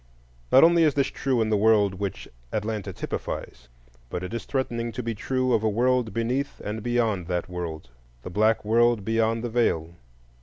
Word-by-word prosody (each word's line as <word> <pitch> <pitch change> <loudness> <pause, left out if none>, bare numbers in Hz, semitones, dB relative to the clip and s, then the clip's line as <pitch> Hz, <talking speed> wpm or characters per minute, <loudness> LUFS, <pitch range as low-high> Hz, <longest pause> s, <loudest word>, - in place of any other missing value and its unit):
Not 135 - +7
only 170 +1 +6
is 155 -4 +3
this 140 -1 +3
true 130 -4 0
in 110 - -2
the - - +4
world 105 -2 +4
which 95 0 -5 0.2
Atlanta 105 -1 -3
typifies, - - -6 0.4
but 90 - -4
it 90 - -6
is 115 - -4
threatening 120 -3 -2
to 125 - -4
be 115 0 -2
true 130 +3 -1
of 110 - +3
a 110 - +1
world 120 +1 +1
beneath 125 +5 -2
and 105 +2 -4
beyond 115 -6 0
that 90 -1 -2
world,—the 60 -8 -8
Black 110 +3 +2
World 115 -1 +3
beyond 115 +1 +1
the 120 - -2
Veil. 85 -9 0
110 Hz, 180 wpm, -25 LUFS, 100-120 Hz, 0.4 s, Not